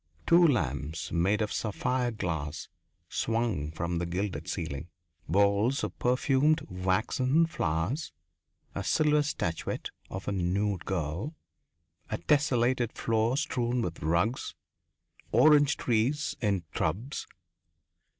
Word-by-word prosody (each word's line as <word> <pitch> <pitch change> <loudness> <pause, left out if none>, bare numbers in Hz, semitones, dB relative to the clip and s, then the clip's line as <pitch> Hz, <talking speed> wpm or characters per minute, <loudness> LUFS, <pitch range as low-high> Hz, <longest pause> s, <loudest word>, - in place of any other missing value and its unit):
Two 170 0 +6
lamps 80 - -1
made 95 +6 +2
of 105 - -3
sapphire 125 +1 -1
glass 80 -8 -4 0.4
swung 115 -10 -1
from 85 +1 -2
the 85 - -2
gilded 95 +3 -3
ceiling.... 70 +4 -4 0.4
Bowls 100 - +3
of - - -4
perfumed, 135 +5 +3
waxen 110 - +2
flowers. 90 - -2 0.6
A - - -3
silver 150 -1 +3
statuette 90 - -3 0.2
of 95 0 -6
a - - 0
nude 95 +1 0
girl. 95 - -3 0.7
A 110 - -1
tessellated 125 -4 +2
floor 115 +3 +1
strewn 125 -5 0
with 85 -1 -4
rugs. 85 +10 0 0.8
Orange 150 -2 +5
trees 125 +6 0
in 100 -6 +1
tubs. 105 - -2
110 Hz, 110 wpm, -29 LUFS, 90-130 Hz, 0.8 s, Two